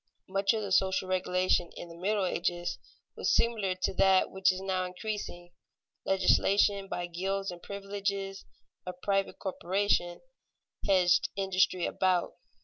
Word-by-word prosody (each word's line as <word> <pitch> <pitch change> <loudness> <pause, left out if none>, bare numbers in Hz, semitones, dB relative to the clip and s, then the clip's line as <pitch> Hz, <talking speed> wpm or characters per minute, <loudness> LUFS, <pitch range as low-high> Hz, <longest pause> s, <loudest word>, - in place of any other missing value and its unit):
Much 195 +1 +1
of 215 - -2
the 200 - -5
social 190 0 +2
regulation 185 -1 +1
in - - -7
the 170 - -11
Middle 195 +3 0
Ages 175 -1 -2 0.4
was - - +1
similar 215 -6 +1
to 185 - -1
that 190 0 +4
which 190 0 +3
is 185 - -5
now 190 -1 -1
increasing. 180 -2 -6 0.5
Legislation 195 +1 +3
by 175 -2 -3
gilds 195 +3 -3
and 175 -1 -10
privileges 200 -1 -4 0.4
of 180 0 -6
private 195 -1 0
corporations 190 -1 -1 0.6
hedged 180 -2 +4
industry 185 -2 +1
about. 185 -2 +1
190 Hz, 135 wpm, -30 LUFS, 180-195 Hz, 0.6 s, that